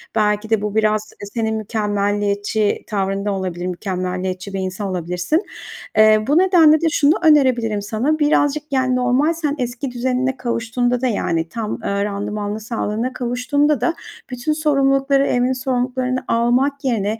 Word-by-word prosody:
Belki 210 0 +1
de 220 -2 +2
bu 210 0 -3
biraz, 215 -1 +1
eee, 205 - -6
senin 220 -1 -1
mükemmeliyetçi 205 -1 -1
tavrında 200 -1 -1
olabilir. 185 -2 -3
Mükemmeliyetçi 185 +1 -4
bir 195 - -2
insan 190 +2 -3
olabilirsin. 180 - -1 0.6
Eee, 215 0 +6
bu 290 +4 +3
nedenle 335 -5 +5
de 330 - +2
şunu 300 -1 +3
önerebilirim 255 -9 +3
sana: 235 +10 -1
Birazcık, 295 0 +2
yani, 260 -1 +1
normal 250 +6 +2
sen 305 -3 -2
eski 250 +2 -3
düzenine 255 +1 -1
kavuştuğunda 245 +1 -1
da 260 - +1
yani 165 -7 -1
tam, 225 -2 -4
ııı, 200 0 -1
randımanlı 205 +1 -3
sağlığına 225 +2 -3
kavuştuğunda 255 +3 0
da 250 - +1 0.4
bütün 250 +4 -2
sorumlulukları, 275 -2 +2
evin 250 +1 +1
sorumluluklarını 255 0 -1
almak 255 +5 +1
yerine, 220 -3 0
235 Hz, 145 wpm, -19 LUFS, 205-265 Hz, 0.6 s, Eee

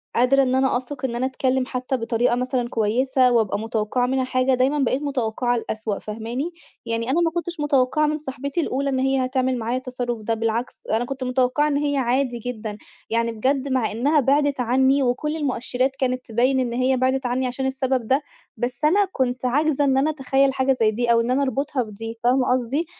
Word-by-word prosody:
قادرة 260 +3 +4
إن 255 0 +1
أنا 265 -1 +2
أثق 260 +1 -6
إن 235 -2 -3
أنا 250 - 0
اتكلّم 260 0 0
حتى 255 0 -2
بطريقة 230 +1 +1
مثلًا 250 -1 -1
كويسة، 250 +4 +2
وابقى 220 -4 +1
متوقعة 225 +2 -1
منها 260 +1 0
حاجة، 255 0 +1
دايمّا 265 +4 +2
بقيت 265 +1 +1
متوقعة 245 -4 -1
الأسوأ 215 -3 -3
فاهماني؟ 230 +9 -4 0.3
يعني 230 +1 -2
أنا 330 +6 +2
ما 330 -1 +2
كنتش 345 -1 -4
متوقعة 295 +1 +2
من 305 - 0
صاحبتي 280 +2 -4
الأولى 275 -1 -1
إن 265 -1 0
هي 265 0 +1
هتعمل 255 -1 0
معايا 235 +2 -1
التصرّف 250 -3 -4
ده، 225 +2 -1
بالعكس 225 +2 -3
أنا 225 +2 0
كنت 270 +1 -5
متوقعة 255 +3 +1
إن 285 -1 +1
هي 285 -1 0
عادي 250 -1 0
جدًا، 220 -3 -5 0.3
يعني 230 +1 0
بجد 260 +5 0
مع 255 -4 +1
إنّها 280 +8 +2
بعدت 280 0 +2
عنّي 265 +3 +3
وكل 260 +5 -1
المؤشرات 265 -2 -1
كانت 255 -1 -1
تبين 255 +4 +1
إن 240 -2 -1
هي 255 +1 +1
بعدت 260 +1 0
عنّي 250 +1 0
عشان 255 +2 -3
السبب 265 -3 -1
ده، 270 +4 +2 0.4
بس 245 +4 -4
أنا 395 +7 +4
كنت 255 -3 -1
عاجزة 290 +3 +2
إن 270 -2 +2
أنا 285 +3 +2
اتخيّل 270 -2 +1
حاجة 265 0 +2
زي 215 -1 +4
دي، 235 +2 0
أو 230 0 +4
إن 235 +2 -1
أنا 275 +2 +2
اربطها 275 -1 -1
بدي 225 +2 -8
فاهمة 250 +1 +3
قصدي؟ 255 +6 -1
255 Hz, 200 wpm, -23 LUFS, 240-270 Hz, 0.4 s, قادرة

